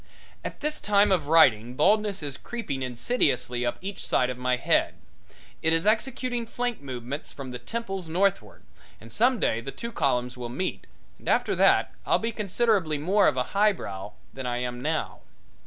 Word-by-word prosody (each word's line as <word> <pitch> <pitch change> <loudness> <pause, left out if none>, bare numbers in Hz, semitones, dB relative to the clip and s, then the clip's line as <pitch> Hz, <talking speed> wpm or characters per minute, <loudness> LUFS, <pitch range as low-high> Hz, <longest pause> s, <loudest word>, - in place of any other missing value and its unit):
At - - -6
this 300 +1 -2
time 205 0 +4
of 165 -6 +2
writing 125 -7 +5
baldness 200 +4 +2
is 140 -2 -4
creeping 145 - -5
insidiously 125 - 0
up 120 - -1
each 195 0 -5
side 125 0 +1
of 125 - -7
my 125 0 +1
head. - - +1 0.7
It 160 0 +3
is 165 +2 +3
executing 240 +2 0
flank 245 -3 -3
movements 130 +1 -6
from 135 -2 -8
the 125 - -6
temples 195 - -5
northward, 175 - 0 0.4
and 115 - -13
some 245 +1 +3
day 115 - +1
the 115 - -6
two 235 +9 -6
columns 125 - 0
will 120 -1 -6
meet 160 +10 -4 0.3
and - - -6
after - - +2
that - - +4
I'll - - +3
be 230 +1 -2
considerably 205 -6 +1
more 190 +7 +3
of 140 - +1
a 125 - +2
highbrow 180 - 0 0.2
than 130 -1 -5
I 120 0 -1
am 125 0 -3
now. 155 +2 -2
160 Hz, 175 wpm, -26 LUFS, 125-210 Hz, 0.7 s, writing